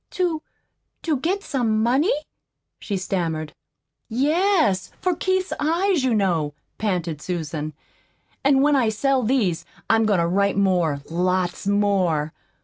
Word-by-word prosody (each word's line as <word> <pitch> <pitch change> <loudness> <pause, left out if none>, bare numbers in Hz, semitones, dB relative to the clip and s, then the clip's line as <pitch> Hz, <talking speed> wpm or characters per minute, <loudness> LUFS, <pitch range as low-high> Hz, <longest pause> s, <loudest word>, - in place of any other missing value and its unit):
"To 345 -4 -1 0.6
to 315 -4 +1
get 370 +9 -1
some 225 -6 0
money?" 270 - +3 0.6
she 200 - -3
stammered. 165 -5 -2 0.6
"Yes 295 - +2
for 365 -2 0
Keith's 375 +1 0
eyes, 335 +1 +1
you 255 -3 +2
know," 165 -8 0 0.2
panted 175 -7 -2
Susan. 155 -3 -4 0.7
"An' 275 -1 +4
when 295 0 +4
I 245 -5 +3
sell 265 +5 +1
these, 220 -8 +1 0.3
I'm 225 -1 +3
goin' 205 -3 +3
to 170 - +2
write 200 +3 +1
more 175 -7 +2
lots 180 +2 0
more. 190 -7 +1
210 Hz, 130 wpm, -23 LUFS, 175-285 Hz, 0.7 s, An